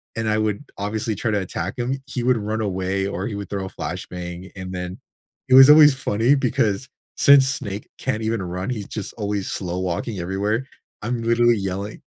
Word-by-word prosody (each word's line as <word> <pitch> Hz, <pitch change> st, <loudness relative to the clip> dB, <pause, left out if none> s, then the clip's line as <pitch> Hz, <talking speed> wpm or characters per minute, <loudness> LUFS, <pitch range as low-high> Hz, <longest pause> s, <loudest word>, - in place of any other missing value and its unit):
and 115 Hz, -1 st, -1 dB
I 110 Hz, -, +2 dB
would 110 Hz, +2 st, -1 dB
obviously 110 Hz, +2 st, -2 dB
try 110 Hz, +2 st, -1 dB
to 105 Hz, -, +1 dB
attack 95 Hz, +2 st, -4 dB
him, 125 Hz, +2 st, -1 dB
he 135 Hz, -3 st, -4 dB
would 125 Hz, -1 st, +3 dB
run 110 Hz, +1 st, -2 dB
away 95 Hz, -1 st, -1 dB
or 95 Hz, -1 st, -3 dB
he 115 Hz, -, -5 dB
would 100 Hz, 0 st, -6 dB
throw 100 Hz, -2 st, -3 dB
a -, -, -6 dB
flashbang, 90 Hz, 0 st, -6 dB
and 95 Hz, -1 st, -7 dB
then 90 Hz, 0 st, -5 dB, 0.5 s
it -, -, +3 dB
was 135 Hz, +1 st, +10 dB
always 150 Hz, -1 st, +9 dB
funny 125 Hz, +1 st, +2 dB
because 125 Hz, -2 st, 0 dB, 0.3 s
since 140 Hz, -1 st, +7 dB
Snake 105 Hz, -7 st, -4 dB
can't 110 Hz, -4 st, -2 dB
even 110 Hz, -2 st, -1 dB
run, 90 Hz, +3 st, -4 dB
he's 110 Hz, -6 st, -4 dB
just 105 Hz, -2 st, -6 dB
always 100 Hz, -2 st, -2 dB
slow 90 Hz, -1 st, -3 dB
walking 95 Hz, +3 st, -3 dB
everywhere. 100 Hz, +7 st, -1 dB, 0.4 s
I'm 115 Hz, +2 st, -2 dB
literally 115 Hz, 0 st, +3 dB
yelling 95 Hz, +1 st, -4 dB
105 Hz, 195 wpm, -22 LUFS, 95-120 Hz, 0.5 s, was